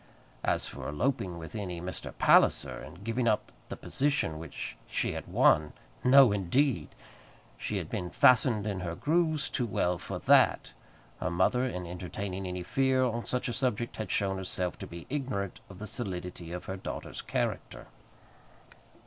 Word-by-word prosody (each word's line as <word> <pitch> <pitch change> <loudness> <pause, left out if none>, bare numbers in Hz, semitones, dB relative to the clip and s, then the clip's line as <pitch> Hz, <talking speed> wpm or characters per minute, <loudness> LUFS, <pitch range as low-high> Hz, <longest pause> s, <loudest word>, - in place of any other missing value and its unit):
As - - +1
for - - -6
eloping 95 - -1
with 80 +5 -8
any 90 -5 -4
Mr. 90 +2 -5
Palliser, - - +4
and 85 +5 -10
giving 115 +2 0
up 110 - +1 0.2
the - - -5
position 135 - 0
which 85 - -6
she - - 0
had - - -6
won; 75 0 +4 0.3
no, 130 -2 +8
indeed! 100 - +1 0.7
She - - -3
had - - -3
been 90 - -3
fastened 115 0 +4
in 100 -3 -2
her 85 -2 -4
grooves 155 - +1
too 120 - -1
well 90 -4 0
for - - -5
that! - - +4 0.5
Her 90 - -1
mother, 95 +9 +2
in 90 -7 -4
entertaining 90 +2 -5
any 90 0 -4
fear 130 +5 +2
on 120 -2 -1
such 125 - -1
a 120 - -2
subject, 120 -3 -1
had 110 - -4
shown 95 -2 +1
herself 90 -1 -2
to - - -6
be 85 -1 -9
ignorant 130 -9 -3
of 95 - -11
the 105 - -6
solidity 90 -6 -5
of 90 0 -5
her 95 - -4
daughter's - - -6
character. - - -3
100 Hz, 165 wpm, -30 LUFS, 90-125 Hz, 0.7 s, no